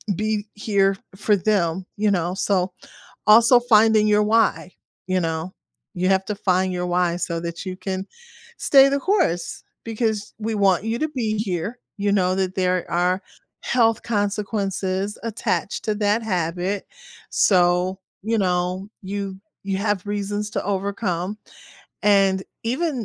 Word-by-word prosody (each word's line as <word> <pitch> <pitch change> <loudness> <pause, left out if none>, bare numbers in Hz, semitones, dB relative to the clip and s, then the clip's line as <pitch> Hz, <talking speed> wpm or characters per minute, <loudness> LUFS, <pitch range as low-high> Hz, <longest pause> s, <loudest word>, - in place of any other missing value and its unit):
be 215 +1 -1
here 200 -2 +1 0.2
for 210 +1 +2
them, 190 -3 0
you 210 0 +2
know, 180 -1 0
so. 185 -2 0 0.6
Also 235 +3 +7
finding 220 -2 +4
your 210 0 +4
"why," 215 -4 +2 0.4
you 185 0 +1
know? 165 +1 -3 0.4
You 185 +1 0
have 190 0 +3
to 210 - -3
find 185 -1 +1
your 180 0 -2
"why" 175 -1 +1
so 170 -2 -2
that 170 +2 -6
you 185 - -4
can 190 +1 -4 0.5
stay 275 -1 +6
the 280 0 0
course 280 - 0 0.2
because 220 -2 -2
we 220 0 -2
want 195 -3 +3
you 225 +1 -1
to 310 - 0
be 225 -7 -2
here, 205 +2 -3 0.2
you 205 0 0
know 185 -2 +2
that 190 -1 -1
there 185 -1 0
are 180 +2 +1 0.4
health 225 -3 +2
consequences 200 -2 -2
attached 200 -5 -2
to 215 -1 0
that 210 +2 +1
habit, 180 0 -2 0.4
so, 180 0 +3 0.2
you 225 +1 0
know, 180 0 -1
you 195 0 -5 0.2
you 195 -1 -2
have 205 -1 -1
reasons 205 +1 -2
to - - -2
overcome 200 -1 -2 0.7
and 195 -2 +4 0.2
even 260 0 -1
200 Hz, 145 wpm, -22 LUFS, 185-215 Hz, 0.7 s, Also